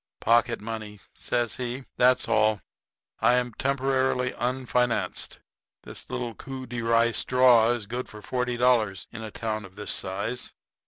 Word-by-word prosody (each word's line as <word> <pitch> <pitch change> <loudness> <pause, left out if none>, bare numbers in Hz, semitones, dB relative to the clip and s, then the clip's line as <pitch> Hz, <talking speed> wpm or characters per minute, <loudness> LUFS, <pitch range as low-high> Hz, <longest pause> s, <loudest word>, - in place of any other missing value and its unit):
"Pocket 120 +1 +3
money," 110 -2 -6
says 120 -2 -1
he; 125 +1 -4
"that's 125 +1 +4
all. 110 -1 +3 0.6
I 120 - +4
am 125 -1 0
temporarily 130 -1 +1
unfinanced. 125 0 -1 0.5
This - - -6
little 120 -2 -3
coup 130 +3 -7
de 120 -2 -4
rye 115 0 +3
straw 125 -2 +5
is 120 -3 -1
good 120 +4 -5
for 105 -1 -11
forty 125 0 -1
dollars 115 -7 +2
in 110 - -8
a 110 - -5
town 110 0 -3
of 95 -1 -13
this 105 -1 -3
size. 100 +6 -2
120 Hz, 150 wpm, -26 LUFS, 110-125 Hz, 0.6 s, straw